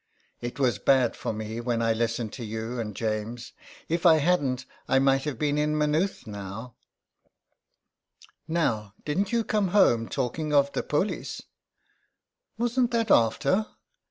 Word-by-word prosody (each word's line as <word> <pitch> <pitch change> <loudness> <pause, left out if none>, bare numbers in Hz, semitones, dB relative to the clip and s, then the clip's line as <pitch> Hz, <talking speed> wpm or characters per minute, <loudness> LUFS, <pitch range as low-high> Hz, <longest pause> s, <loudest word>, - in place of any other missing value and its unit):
"It 120 0 -5
was 120 -6 +2
bad 130 0 +3
for - - -3
me 110 +1 -5
when 120 -1 -1
I 115 -1 +2
listened 115 -1 -2
to 125 - -6
you 110 +2 -4
and 105 -3 -4
James. 110 +2 -3 0.3
If 170 +1 -1
I 170 -3 +7
hadn't 140 -6 +1 0.2
I - - +3
might 135 +1 +3
have 145 -5 -3
been 150 +2 0
in 150 0 +1
Maynooth 150 +5 0
now." 105 +3 -7 0.9
" - - -52 0.7
Now, 110 - -1
didn^t 190 +8 0
you 235 -1 +2
come 210 -2 +1
home 120 - +3
talking 150 +5 -2
of 140 0 +3
the - - 0
polis? 150 +8 -2 1.2
''Wasn't 240 +1 +1
that 230 -2 0
after?" 185 - +3
130 Hz, 150 wpm, -27 LUFS, 115-160 Hz, 1.2 s, I